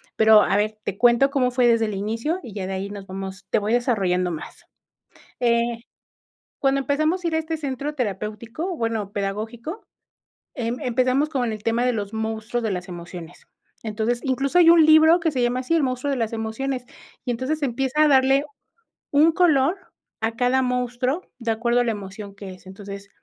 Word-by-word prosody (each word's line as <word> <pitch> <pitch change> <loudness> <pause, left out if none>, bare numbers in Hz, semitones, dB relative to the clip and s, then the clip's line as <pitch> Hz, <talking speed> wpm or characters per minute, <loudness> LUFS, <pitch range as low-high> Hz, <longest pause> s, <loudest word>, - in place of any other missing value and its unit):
pero, 220 -1 +7
a - - +1
ver, 215 +1 -1
te 195 - -4
cuento 240 +4 +4
cómo 260 -3 +1
fue 245 -1 +3
desde 230 -1 +3
el 215 - -3
inicio 225 - -2
y 220 - -9
ya 195 -3 -4
de 190 - -4
ahí 190 +1 -4
nos 200 -1 -8
vamos 190 0 -7
te - - +2
voy 210 +2 -1
desarrollando 190 -8 +1
más, 160 - -8 0.7
eh, 235 -1 +3 1.0
cuando 275 0 +2
empezamos 310 +6 0
a - - 0
ir 325 - -1
a - - +3
este 320 0 -3
centro 285 0 -4
terapéutico, 230 - -4
bueno, 225 -3 -2
pedagógico, 225 - -4 0.7
em, 240 -1 -3
empezamos 255 +2 +1
con 250 -6 -1
el 215 -1 -7
tema 230 +2 +1
de 250 - +2
los 205 -2 -4
monstruos 220 +2 -3
de 220 - -1
las 180 -1 -4
emociones, 175 -1 -9 0.4
entonces, 225 +2 -1
incluso 270 +4 +1
hay 340 -2 +7
un 335 -2 +7
libro 315 +2 +6
que 330 -1 +1
se 260 -4 -1
llama 245 +1 +1
así, 260 +6 -1
el 325 - +3
monstruo 255 +1 -1
de 275 - 0
las 225 -1 -1
emociones, 245 +4 -3 0.4
y 250 - -2
entonces 275 +6 -2
empieza 270 +3 0
a - - +4
darle 270 0 +4 0.7
un 305 +3 +5
color 320 -1 +3 0.4
a 225 +1 0
cada 255 +2 +2
monstruo 250 +5 -1 0.2
de 230 -2 -1
acuerdo 235 +2 +1
a 245 - +2
la 230 - 0
emoción 200 0 -8
que 200 -1 -9
es, 185 0 -13
entonces, 200 +1 -9
240 Hz, 190 wpm, -23 LUFS, 210-275 Hz, 1.0 s, pero